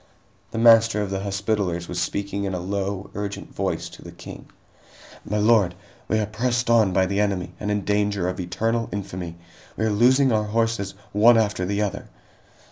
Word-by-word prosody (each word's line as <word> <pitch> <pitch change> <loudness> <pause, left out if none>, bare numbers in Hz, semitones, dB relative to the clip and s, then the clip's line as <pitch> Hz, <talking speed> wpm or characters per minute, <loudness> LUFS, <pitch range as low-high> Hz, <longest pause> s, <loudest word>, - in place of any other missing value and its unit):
The - - -6
Master 115 -2 +5
of 100 - -5
the 95 - -1
Hospitallers 100 -3 -2
was 90 0 -3
speaking 100 +2 -2
in 95 -1 -2
a - - -3
low, 100 +1 -3
urgent 100 -1 -5
voice - - -2
to - - -14
the - - -10
King: - - -11 0.8
"My 105 - -2
lord, 105 -4 +3 0.3
we 110 - +1
are 110 - +1
pressed 120 +3 -1
on 110 -4 +4
by 95 +1 +3
the 100 +2 -1
enemy 95 -4 -1
and 105 - -3
in 105 -1 -1
danger 105 -3 0
of 90 +1 -3
eternal 115 +6 -1
infamy. 90 -4 -5 0.4
We 110 - 0
are 110 - +1
losing 130 +5 +4
our 105 -1 +1
horses, 110 -2 -1 0.2
one 115 +3 +6
after 105 -4 +1
the 100 +2 0
other!" 100 - -4
105 Hz, 185 wpm, -23 LUFS, 95-110 Hz, 0.8 s, one